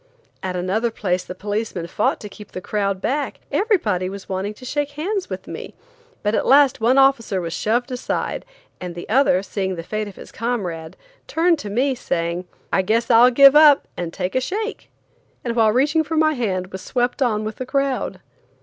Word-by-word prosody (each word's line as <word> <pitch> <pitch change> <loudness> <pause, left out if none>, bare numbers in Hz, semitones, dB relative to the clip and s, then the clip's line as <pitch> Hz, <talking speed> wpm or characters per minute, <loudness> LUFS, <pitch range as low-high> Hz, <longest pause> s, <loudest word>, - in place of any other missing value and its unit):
At 185 -1 -3
another 190 +6 0
place 185 -5 -1
the 180 - -8
policemen 205 -2 -3
fought 175 +5 0
to 210 - -6
keep 205 0 -13
the - - -4
crowd 200 0 -2
back; 285 +6 -2
everybody 220 - +1
was 195 0 -8
wanting 195 +2 -3
to 255 - -12
shake 290 +2 -2
hands 380 +6 -3
with - - -6
me, - - -8 0.5
but 210 +1 +1
at - - 0
last 275 -3 +5
one 245 +4 +4
officer 270 -8 +3
was 165 -2 -4
shoved 240 +7 0
aside, 250 0 -3 0.4
and 180 -1 -6
the 175 - -7
other 220 -6 +3
seeing 190 -2 -3
the 165 - -6
fate 215 +4 -3
of 200 - -10
his - - -12
comrade, 180 -9 -3 0.3
turned 335 0 +2
to 210 - -6
me, 260 +6 +1
saying: 170 -6 -2 0.3
"I - - +4
guess 225 +6 +1
I'll 235 +2 +7
give 275 +3 +7
up 300 -2 +7
and 170 -2 -4
take 180 +1 -3
a 255 - +1
shake," 430 - -4 0.5
and 235 -1 -2
while 220 -2 +4
reaching 290 +7 +2
for 320 +1 -3
my 310 0 +4
hand 190 -8 -2
was 190 - -6
swept 245 +1 -1
on 215 -4 +1
with 215 0 -5
the 255 - -4
crowd. 275 -1 -1
225 Hz, 195 wpm, -21 LUFS, 190-275 Hz, 0.5 s, I'll